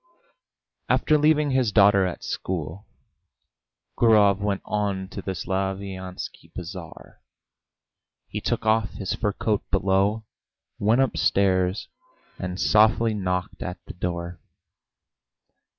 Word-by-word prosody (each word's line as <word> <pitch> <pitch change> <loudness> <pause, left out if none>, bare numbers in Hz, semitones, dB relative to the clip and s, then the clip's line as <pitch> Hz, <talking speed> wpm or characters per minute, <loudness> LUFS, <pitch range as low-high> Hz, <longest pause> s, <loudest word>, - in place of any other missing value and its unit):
After 155 - +3
leaving 150 -1 +3
his 130 -4 +2
daughter 100 -2 +5
at 90 - -6
school, 90 +2 -4 1.1
Gurov 105 -4 +5
went 100 -1 -2
on 100 -3 -2
to 100 - -7
the 95 0 -4
Slaviansky 95 0 -4
Bazaar. 90 -2 -9 1.1
He - - -5
took - - -2
off 110 0 +2
his 95 - -3
fur 105 -3 -1
coat 105 0 0
below, 100 +3 +1 0.5
went 110 +5 +3
upstairs, 95 -6 +1 0.5
and 90 +1 -4
softly 110 +1 +4
knocked 90 -2 -3
at 90 -1 -4
the - - -9
door. 85 0 -4
100 Hz, 105 wpm, -24 LUFS, 95-110 Hz, 1.1 s, daughter